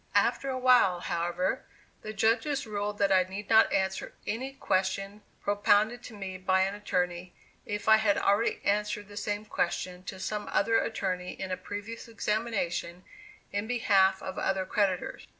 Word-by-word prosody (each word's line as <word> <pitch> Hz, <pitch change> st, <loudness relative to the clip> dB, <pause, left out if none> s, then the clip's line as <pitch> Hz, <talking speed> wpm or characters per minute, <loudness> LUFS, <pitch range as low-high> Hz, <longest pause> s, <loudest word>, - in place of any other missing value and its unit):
After 275 Hz, -, +2 dB
a 260 Hz, -, -1 dB
while, 250 Hz, -9 st, +4 dB
however, 175 Hz, +2 st, -1 dB, 0.4 s
the 215 Hz, -, -6 dB
judges 225 Hz, +7 st, +1 dB
ruled 205 Hz, -1 st, -3 dB
that 200 Hz, -1 st, +2 dB
I 190 Hz, -1 st, +6 dB
need 195 Hz, +3 st, -6 dB
not 220 Hz, 0 st, +6 dB
answer 190 Hz, 0 st, -1 dB
any 260 Hz, +5 st, -3 dB
question 195 Hz, -2 st, -1 dB, 0.2 s
propounded 205 Hz, +3 st, +2 dB
to 225 Hz, -, -9 dB
me 190 Hz, -2 st, -6 dB
by 190 Hz, 0 st, +2 dB
an 195 Hz, +1 st, +1 dB
attorney, 180 Hz, -3 st, -2 dB, 0.3 s
if 205 Hz, 0 st, -4 dB
I 220 Hz, 0 st, +8 dB
had 215 Hz, -2 st, +2 dB
already 205 Hz, +3 st, +2 dB
answered 210 Hz, 0 st, 0 dB
the 205 Hz, -, -11 dB
same 205 Hz, 0 st, -3 dB
question 180 Hz, -2 st, -2 dB
to 190 Hz, -, -7 dB
some 210 Hz, +2 st, -3 dB
other 225 Hz, 0 st, +3 dB
attorney 185 Hz, -4 st, -2 dB
in 190 Hz, -1 st, -4 dB
a -, -, +1 dB
previous 205 Hz, +5 st, -7 dB
examination 210 Hz, -6 st, -2 dB, 0.5 s
in 205 Hz, +2 st, -2 dB
behalf 195 Hz, -5 st, +3 dB
of 190 Hz, 0 st, -5 dB
other 190 Hz, -1 st, 0 dB
creditors. 195 Hz, -3 st, -1 dB
205 Hz, 160 wpm, -29 LUFS, 190-220 Hz, 0.5 s, I